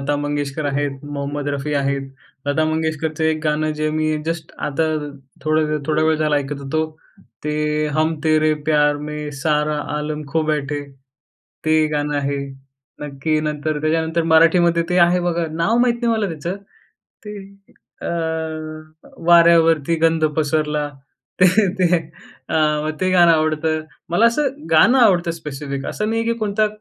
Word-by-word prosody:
लता 145 +2 -1
मंगेशकर 145 0 -3
आहेत, 140 -1 -2
मोहम्मद 145 0 -4
रफी 145 +1 -3
आहेत. 140 -1 0 0.4
लता 145 +2 +1
मंगेशकरचं 160 0 -1
एक 160 0 +1
गाणं 155 0 0
जे 155 0 0
मी 155 0 0
जस्ट 165 -1 -4
आता, 150 +3 0 0.6
थोडंवेळ 155 0 +1
थोडावेळ 155 0 +2
झाला 155 -1 +1
ऐकत 145 0 -3
होतो. 155 +3 -1 0.6
ते 150 0 0
हम 155 +1 +1
तेरे 155 0 +3 0.2
प्यार 150 -1 +3
में 150 0 -5
सारा 150 0 +1 0.2
आलम 150 0 -3
खो 160 +2 0
बैठे. 150 -2 -1 0.8
ते 155 0 +3
गाणं 145 0 -1
आहे. 140 0 -1 0.6
नक्की. 150 +2 -1
नंतर 150 0 -2
त्याच्यानंतर 160 +2 0
मराठीमध्ये 170 +1 +4
ते 180 - +2
आहे 175 +1 +4
बघा, 170 -1 -1
नाव 170 +8 +1
माहीत 245 -1 +3
नाही 235 -1 +2
मला 215 -3 0
त्याच 150 +1 -11 0.8
ते 210 0 -7 0.7
अ, - - -4 1.2
वाऱ्यावरती 165 -2 +5
गंध 165 0 +2
पसरला 150 -1 0 0.5
ते, 185 - +8 0.3
ते 180 -1 +3 0.6
आव 155 -1 +1
ते 185 - +1
गाणं 175 -2 +6
आवडतं. 155 0 0 0.3
मला 205 +7 +4
असं 275 +5 +2 0.2
गाणं 230 +11 +5
आवडतं, 185 -8 +4
स्पेसिफिक 140 -4 -6
असं 210 - -2
नाही 225 0 0
आहे, 230 0 0
की - - -5
कोणता 215 0 +1
155 Hz, 145 wpm, -20 LUFS, 150-165 Hz, 1.2 s, ते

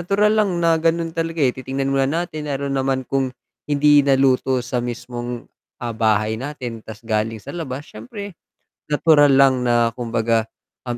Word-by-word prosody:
natural 200 +4 +2
lang 215 -2 +2
na 165 -1 +3
gano'n 165 0 0
talaga, 165 0 -3
eh, 125 - +3
titingnan 135 +1 -3
mo 135 - +2
natin, 155 +1 -2
lalo 140 0 -2
naman 135 -1 0
kung 135 -1 0 0.4
hindi 145 0 +5
naluto 135 -1 +2
sa 125 0 -2
mismong, 120 0 -5 0.3
ah, 120 -1 -4
bahay 110 0 +1
natin 125 -5 -6
ta's 110 +1 -11
galing 110 0 -1
sa 140 +7 -9
labas, 145 -4 -5
siyempre 200 - -9 0.6
natural 150 -1 +5
lang 135 -2 +5
na 120 -1 +2
kumbaga, 115 -1 -1 0.4
um, 120 - -2
135 Hz, 160 wpm, -21 LUFS, 120-150 Hz, 0.6 s, hindi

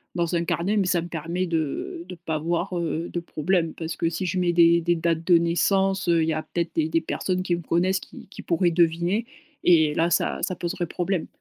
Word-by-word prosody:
dans 170 0 0
un 170 - +1
carnet 190 +6 0
mais 200 - +2
ça 180 -1 +2
me 170 - -6
permet 170 +3 -3
de 165 0 -3
de 180 - -8
pas 165 -2 -4
avoir, 170 +4 -1
heu, 170 0 -2
de 175 - -2
problème, 170 0 -1
parce 165 0 -5
si 170 +3 -3
je 185 +1 -1
mets 175 -1 +1
des 170 0 +5
des 175 +1 +1
dates 165 0 0
de 175 -1 +6
naissance, 190 +3 +1
heu, 170 -1 +4
il 160 - +1
y - - +1
a 155 0 -3
peut-être 170 -1 -3
des 160 -1 +1
des 165 +1 +1
personnes 185 +3 -2
qui 175 -2 0
me 170 - -6
connaissent 185 +4 +1
qui - - -13
qui - - -10
pourraient 175 0 +1
deviner 170 +5 +1 0.4
et 160 -4 +5
là 165 +1 +2
ça - - +1
ça - - 0
poserait 175 +1 -3
problème. 180 +1 -2
170 Hz, 230 wpm, -24 LUFS, 165-180 Hz, 0.4 s, de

